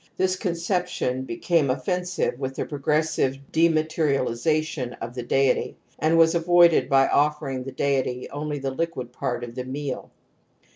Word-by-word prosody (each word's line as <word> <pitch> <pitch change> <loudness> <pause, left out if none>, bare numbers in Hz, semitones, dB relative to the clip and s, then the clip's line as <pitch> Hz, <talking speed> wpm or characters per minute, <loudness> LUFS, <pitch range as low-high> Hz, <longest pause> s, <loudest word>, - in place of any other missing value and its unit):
This 185 0 +1
conception 175 - -2
became 145 +4 +1
offensive 180 +2 -1
with 135 -1 -4
the - - -2
progressive 150 -1 0
dema 160 -1 +3
terialization 150 -2 -1
of 115 +1 -6
the 125 - -4
deity, 135 +2 +1 0.2
and 160 +2 +3
was 165 0 +5
avoided 170 -5 +4
by 135 -1 +5
offering 145 -3 +1
the 135 - -5
deity 130 -2 -1
only 150 +1 -3
the 135 -1 -3
liquid 130 -5 -4
part 125 -2 -3
of 120 -1 -7
the 125 +1 -4
meal. 135 +1 -5
145 Hz, 145 wpm, -24 LUFS, 130-165 Hz, 0.2 s, was